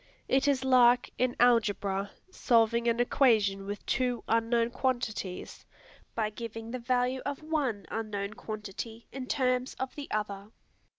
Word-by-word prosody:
It 270 Hz, +2 st, +2 dB
is 270 Hz, -2 st, +2 dB
like, 250 Hz, -2 st, +5 dB
in 255 Hz, -1 st, +1 dB
algebra, 205 Hz, -5 st, +2 dB, 0.2 s
solving 235 Hz, -5 st, +2 dB
an 235 Hz, 0 st, +2 dB
equation 215 Hz, -6 st, +3 dB
with 205 Hz, 0 st, -6 dB
two 250 Hz, -2 st, 0 dB
unknown 230 Hz, +1 st, +2 dB
quantities, 240 Hz, -8 st, -3 dB, 0.5 s
by 215 Hz, -2 st, 0 dB
giving 225 Hz, 0 st, -7 dB
the 255 Hz, -, -4 dB
value 250 Hz, +1 st, 0 dB
of 285 Hz, +1 st, -4 dB
one 285 Hz, -10 st, -1 dB
unknown 210 Hz, -2 st, -3 dB
quantity 220 Hz, 0 st, -7 dB
in 265 Hz, -2 st, -6 dB
terms 255 Hz, -1 st, 0 dB
of 260 Hz, 0 st, -4 dB
the 290 Hz, -1 st, -7 dB
other. 205 Hz, -1 st, -3 dB
235 Hz, 135 wpm, -30 LUFS, 215-255 Hz, 0.5 s, like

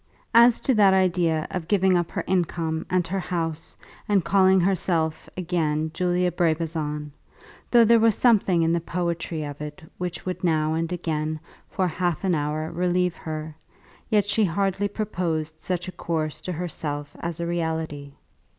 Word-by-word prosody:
As 235 Hz, +1 st, +7 dB
to 265 Hz, -, +2 dB
that 200 Hz, -4 st, +5 dB
idea 175 Hz, -4 st, +2 dB
of 180 Hz, -3 st, -4 dB
giving 190 Hz, -2 st, +3 dB
up 175 Hz, -1 st, +1 dB
her -, -, -3 dB
income 165 Hz, -3 st, -1 dB
and 180 Hz, -1 st, +1 dB
her 190 Hz, +3 st, -2 dB
house, 165 Hz, -3 st, -3 dB, 0.3 s
and 195 Hz, -4 st, +3 dB
calling 190 Hz, +1 st, +5 dB
herself 175 Hz, -3 st, 0 dB
again 160 Hz, -3 st, -1 dB
Julia 180 Hz, 0 st, +1 dB
Brabazon, 155 Hz, -3 st, -1 dB, 0.6 s
though 235 Hz, -1 st, +6 dB
there 230 Hz, +1 st, +6 dB
was 225 Hz, -2 st, +4 dB
something 195 Hz, -8 st, +3 dB
in 165 Hz, +1 st, +2 dB
the 170 Hz, -, +2 dB
poetry 170 Hz, -1 st, -3 dB
of 145 Hz, 0 st, -7 dB
it 150 Hz, +1 st, -7 dB, 0.2 s
which 180 Hz, -1 st, -4 dB
would 185 Hz, 0 st, -4 dB
now 155 Hz, -2 st, +2 dB
and 165 Hz, +1 st, -1 dB
again 155 Hz, -3 st, -2 dB, 0.3 s
for 185 Hz, -2 st, 0 dB
half 175 Hz, +1 st, -1 dB
an 190 Hz, -2 st, +2 dB
hour 155 Hz, +1 st, -1 dB
relieve 180 Hz, 0 st, +1 dB
her, 155 Hz, -1 st, -6 dB, 0.5 s
yet 210 Hz, -2 st, +3 dB
she 215 Hz, +2 st, +2 dB
hardly 195 Hz, +3 st, 0 dB
proposed 170 Hz, -7 st, -3 dB
such 180 Hz, 0 st, -3 dB
a -, -, -4 dB
course 160 Hz, -3 st, -3 dB
to 185 Hz, -, -4 dB
herself 150 Hz, -4 st, -5 dB
as 170 Hz, -1 st, -4 dB
a 170 Hz, -, -2 dB
reality. 160 Hz, -4 st, -3 dB
170 Hz, 160 wpm, -25 LUFS, 160-185 Hz, 0.6 s, As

